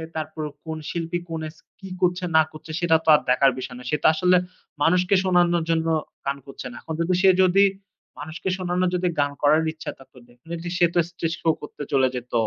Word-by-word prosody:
তারপর 155 0 -4 0.2
কোন 160 0 -4
শিল্পী 170 0 -3
কোন 160 -1 -4
এস 160 - -16 0.2
কী 195 - -9
করছে 180 0 +1
না 160 - +8
করছে 155 +1 -10
সেটা 170 -2 +3
তো - - +2
আর - - +2
দেখার 135 +1 +4
বিষয় 125 0 -6
না। - - -11
সে - - +3
তো - - +6
আসলে 180 +3 +3 0.5
মানুষকে 180 +3 +3
শোনানোর 175 -2 +3
জন্য 165 0 +1 0.4
গান 140 0 -1
করছে 135 -2 -8
না। - - -11
এখন 160 - -6
যদি 180 +2 +1
সে 190 - +6
যদি 190 +2 +5 0.6
মানুষকে 155 +5 -5
শোনানোর 180 0 0
যদি 180 0 0
গান 145 0 +2
করার 150 +2 +4
ইচ্ছা 155 - -6
থাকতো 135 -1 -18
definitely 165 +8 -8
সে 175 - +5
তো - - +4
stage 165 -1 -3
show 165 - +3
করতে 150 0 -8
চলে 130 -1 +4
যেত। 125 0 -7
165 Hz, 205 wpm, -23 LUFS, 150-175 Hz, 0.6 s, না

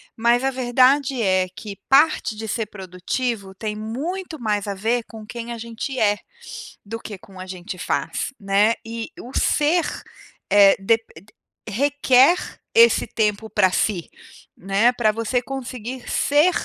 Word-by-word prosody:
mas 235 +2 +2
a 270 - +1
verdade 260 +1 +2
é 185 -3 +2
que 200 +2 -9
parte 280 -4 +4
de 220 +1 -6
ser 225 0 -2
produtivo 195 +2 -4
tem 210 +1 -4
muito 310 - -5
mais 210 -3 -1
a 200 - -3
ver 230 +5 0
com 220 -2 -11
quem 235 +1 -7
a 235 - -5
gente 235 +3 -5
é, 205 -1 +2 0.7
do 225 +3 -6
que 210 -3 -8
com 190 0 -15
a 185 - -6
gente 185 +1 -7
faz, 270 - -2
né? 205 +2 +3
E 225 0 -5
o 250 - -9
ser, 320 +4 +2 0.7
eh, 200 -1 +7
dep 225 +3 +2 0.7
requer 270 - +4 0.4
esse 465 +1 +6
tempo 215 0 -1
para 185 - +3
si, 185 -3 -1 0.5
né, 195 +6 +2
pra 220 -3 +2
você 230 +3 -1
conseguir 255 -2 -6
ser 295 +5 +3
225 Hz, 150 wpm, -22 LUFS, 205-255 Hz, 0.7 s, eh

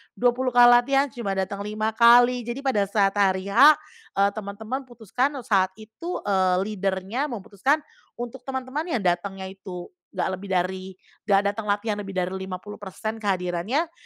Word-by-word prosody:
20 250 +1 +1
kali 240 0 +8
latihan 270 +2 +3
cuma 205 -5 -3
dateng 195 +1 -2
5 215 +2 -2
kali. 240 +1 +5
Jadi 255 +4 -4
pada 210 -8 +1
saat 200 -1 +2
hari 190 0 +1
H, 285 +8 +8 0.4
eee, 200 +1 +4
teman-teman 220 +6 -6
putuskan 245 +4 -2
saat 190 -3 +1
itu, 220 - -7
eee, 185 -2 +2 0.2
leader-nya 195 +7 -2
memutuskan 235 +5 -1 0.3
untuk 240 +2 -6
teman-teman 265 +5 -3
yang 215 - -2
datangnya 190 +2 -1
itu 185 -2 -9 0.2
nggak - - 0
lebih 200 0 -9
dari 185 +1 -1 0.4
nggak 200 -1 +5
datang 210 +1 -6
latihan 205 +1 0
lebih 195 -1 -7
dari 185 0 -1
50% 195 +3 -6
kehadirannya, 200 - -1
210 Hz, 150 wpm, -24 LUFS, 190-245 Hz, 0.4 s, kali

